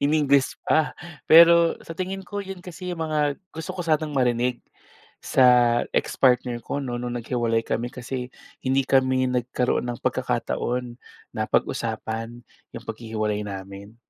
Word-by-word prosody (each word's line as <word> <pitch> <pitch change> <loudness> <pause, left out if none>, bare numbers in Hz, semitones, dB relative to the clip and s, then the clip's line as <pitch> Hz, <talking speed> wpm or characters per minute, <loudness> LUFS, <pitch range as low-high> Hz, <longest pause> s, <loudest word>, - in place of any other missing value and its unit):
iningles 140 -2 +2
pa. 155 -1 +2 0.3
Pero 170 +1 +7
sa 165 - -8
tingin 190 +2 -4
ko 205 +1 -4
yun 195 -1 -8
kasi 180 0 -7
mga 155 -3 0 0.2
gusto 160 0 -5
ko - - -3
sanang 155 -1 +1
marinig 125 -1 +1 0.6
sa 125 -2 +4
ex-partner 125 -2 +2
ko 140 - -3
'no, 125 -2 -3
nung 120 0 -4
nag-hiwalay 115 -1 0
kami 120 +1 -2
kasi 125 0 -5 0.3
hindi 135 +1 +2
kami 130 -1 +3
nagkaroon 125 0 0
ng 120 -1 -5
pagkakataon 125 0 -2 0.4
na - - -1
pag-usapan 115 +2 -2 0.3
yung - - -8
paghihiwalay 110 -2 -3
namin. 100 +2 -8
125 Hz, 130 wpm, -24 LUFS, 120-155 Hz, 0.6 s, Pero